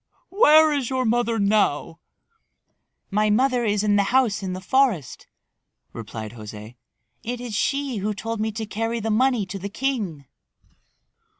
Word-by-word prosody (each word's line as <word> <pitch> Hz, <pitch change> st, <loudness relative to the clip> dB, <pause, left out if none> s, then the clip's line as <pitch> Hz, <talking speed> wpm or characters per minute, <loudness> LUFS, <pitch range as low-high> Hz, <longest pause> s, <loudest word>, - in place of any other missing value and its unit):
Where 315 Hz, -6 st, +6 dB
is 275 Hz, -5 st, -1 dB
your 260 Hz, -1 st, -1 dB
mother 235 Hz, 0 st, +1 dB
now?" 200 Hz, -6 st, +1 dB, 1.1 s
"My 210 Hz, +2 st, +2 dB
mother 250 Hz, +3 st, +2 dB
is 205 Hz, -1 st, +1 dB
in 205 Hz, -1 st, +3 dB
the 200 Hz, -, +3 dB
house 245 Hz, -5 st, +2 dB
in 185 Hz, -2 st, -4 dB
the 185 Hz, -, -5 dB
forest," 210 Hz, -, 0 dB, 0.7 s
replied 110 Hz, -1 st, -7 dB
José. 110 Hz, +1 st, -10 dB, 0.4 s
"It 245 Hz, +1 st, -5 dB
is 245 Hz, -3 st, -6 dB
she 275 Hz, +3 st, -1 dB
who 205 Hz, +1 st, -2 dB
told 225 Hz, +2 st, -4 dB
me 220 Hz, 0 st, -1 dB
to 220 Hz, +1 st, -4 dB
carry 225 Hz, +2 st, -3 dB
the 225 Hz, 0 st, -2 dB
money 245 Hz, -1 st, +2 dB
to 195 Hz, +1 st, -7 dB
the 200 Hz, +2 st, -5 dB
king." 205 Hz, -, -3 dB
215 Hz, 155 wpm, -23 LUFS, 195-250 Hz, 1.1 s, Where